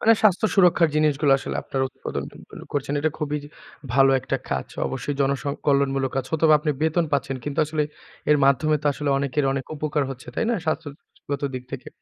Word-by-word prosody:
মানে, 225 - +6
স্বাস্থ্য-সুরক্ষার 185 -4 +4
জিনিসগুলো 150 -2 +3
আসলে - - -4
আপনারা 135 -1 -1
উৎপাদনগুলো - - -8
করছেন। 145 0 -1
এটা 155 +2 +1
খুবই 150 -1 -1 0.6
ভালো 135 0 +6
একটা - - -2
কাজ। - - -1 0.2
অবশ্যই 135 +2 -3
জনসং 140 +1 +1 0.2
কল্যাণমূলক 135 -2 +2
কাজ। 135 - 0
হয়তোবা 160 -1 +4
আপনি 150 0 0
বেতন 160 +2 +2
পাচ্ছেন। 140 -1 0
কিন্তু 145 +1 -4
আসলে 155 0 0 0.5
এর 150 - +6
মাধ্যমে 140 +3 +3
তো - - -1
আসলে 145 +1 -3
অনেকের 140 +1 0
অনেক 135 -1 -3
উপকার 150 0 0
হচ্ছে। 130 -1 -9
তাই - - 0
না? - - +2
স্বাস্থ্যগত 145 -2 -5
দিক 130 - -4
থেকে। 130 -2 -6
145 Hz, 175 wpm, -24 LUFS, 135-155 Hz, 0.6 s, মানে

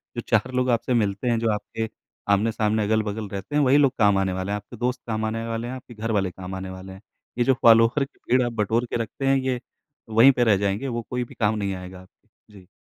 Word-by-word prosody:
जो 120 - -2
4 115 +3 +2
लोग 125 0 +1
आपसे 120 +1 +1
मिलते 105 -1 0
हैं, 115 -1 +1
जो 115 0 0
आपके 110 +1 -4 0.4
आमने-सामने, 110 +1 +1
अगल-बगल 110 0 -1
रहते 100 +9 -6
हैं, 150 - +4
वही 135 +1 +5
लोग 140 -3 +4
काम 105 -2 +4
आने 95 -1 0
वाले 95 +2 -3
हैं, 105 - 0
आपके 105 +4 -11
दोस्त 125 +2 -2
काम 110 -1 -1
आने 115 +1 -3
वाले 115 +1 -3
हैं, 130 - -5
आपके 125 -1 -11
घरवाले 105 -4 -1
काम 95 +1 -7
आने 95 0 -6
वाले 95 0 -9
हैं। 95 - -13 0.4
ये 120 - +3
जो 135 - +4
फ़ॉलोअर 115 +4 +5
की 140 - -27
भीड़ 130 +1 +5
आप 120 - -3
बटोर 115 +2 0
के - - -2
रखते 135 +5 -5
हैं, 135 0 +4
ये 130 -2 -1 0.5
वहीं 115 +5 +7
पे 125 -2 +1
रह 110 -4 +4
जाएँगे, 100 +6 -1
वो 120 -2 -2
कोई 125 0 -2
भी 120 - -12
काम 110 -1 +1
नहीं 100 -2 -2
आएगा 90 0 -9
आपके। 95 - -23 0.3
जी। 90 - -20
110 Hz, 250 wpm, -24 LUFS, 100-120 Hz, 0.5 s, वहीं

